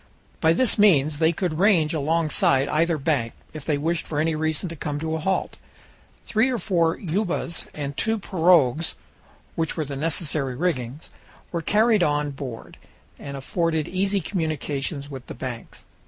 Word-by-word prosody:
By 160 +1 +4
this 235 +3 +2
means 155 -7 +4
they 160 0 +4
could 170 -2 -2
range 180 -6 +4
alongside 150 -3 +2
either 165 +1 +2
bank, 135 -6 0 0.2
if 155 -2 -7
they 150 -3 +1
wished 160 +3 -1
for 150 - -2
any 160 +1 +1
reason 155 +3 -1
to 165 - -7
come 145 -1 -3
to 160 +1 -2
a - - -2
halt. 190 +4 -1 0.7
Three 225 +4 +2
or 250 - 0
four 170 -5 +1
ubas, 180 -1 -2
and 140 -2 -4
two 220 +7 0
pirogues, 165 - +3 0.6
with 165 -1 -1
the 145 -4 -3
necessary 145 -3 -1
rigging, 140 -4 -2 0.5
were 170 - -2
carried 215 +3 +3
on 150 -2 +1
board, 135 -4 -8 0.4
and 140 -1 -6
afforded 160 +2 -1
easy 195 +2 0
communications 155 -4 -2
with 130 -2 -8
the - - -7
banks. 120 -3 -7
160 Hz, 155 wpm, -24 LUFS, 145-175 Hz, 0.7 s, By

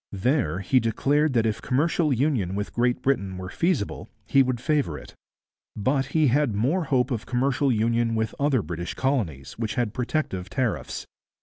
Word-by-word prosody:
There 100 - +1
he 130 +7 +3
declared 140 +6 +1
that 115 -2 +2
if 110 -2 -1
commercial 155 +3 +1
union 120 - +1
with 105 +1 -3
Great 125 +1 +1
Britain 100 -9 0
were 95 0 -6
feasible, 170 - -1 0.2
he 135 - +4
would 130 -2 0
favour 140 - 0
it. - - -12 0.6
But 135 +5 0
he 155 +3 +2
had 135 -3 +2
more 150 - +1
hope 130 -1 +1
of 115 -4 -3
commercial 130 +2 +1
union 115 0 +1
with 110 -1 -1
other 140 -6 +2
British 85 0 -5
colonies, 105 - -2
which 110 -2 -2
had 120 -4 -1
protective 125 -8 -2
tariffs. 120 +3 -2
125 Hz, 170 wpm, -25 LUFS, 105-140 Hz, 0.6 s, he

